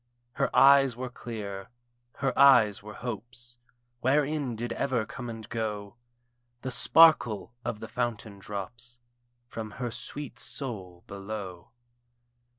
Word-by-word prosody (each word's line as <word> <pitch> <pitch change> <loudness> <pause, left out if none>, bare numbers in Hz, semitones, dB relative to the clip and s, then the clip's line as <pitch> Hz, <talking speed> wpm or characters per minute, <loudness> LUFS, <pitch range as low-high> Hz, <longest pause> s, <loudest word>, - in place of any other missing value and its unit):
Her - - 0
eyes 135 -2 +7
were 125 0 -5
clear, 100 -6 -7 0.5
her 135 0 0
eyes 125 -7 +6
were 105 +1 -10
Hope's, 120 +1 -7 0.4
Wherein 140 0 +1
did 120 +1 -3
ever 125 -5 0
come 120 +1 -7
and 110 -2 -7
go 105 -1 -4 0.7
The 130 - -3
sparkle 120 -6 +5
of 105 - -4
the 110 - -6
fountain 115 -4 -3
drops 110 +5 -6 0.5
From 110 -2 -6
her 125 -2 -3
sweet 140 +4 -7
soul 95 -10 -4
below. 100 -3 -7
120 Hz, 120 wpm, -28 LUFS, 105-125 Hz, 0.7 s, eyes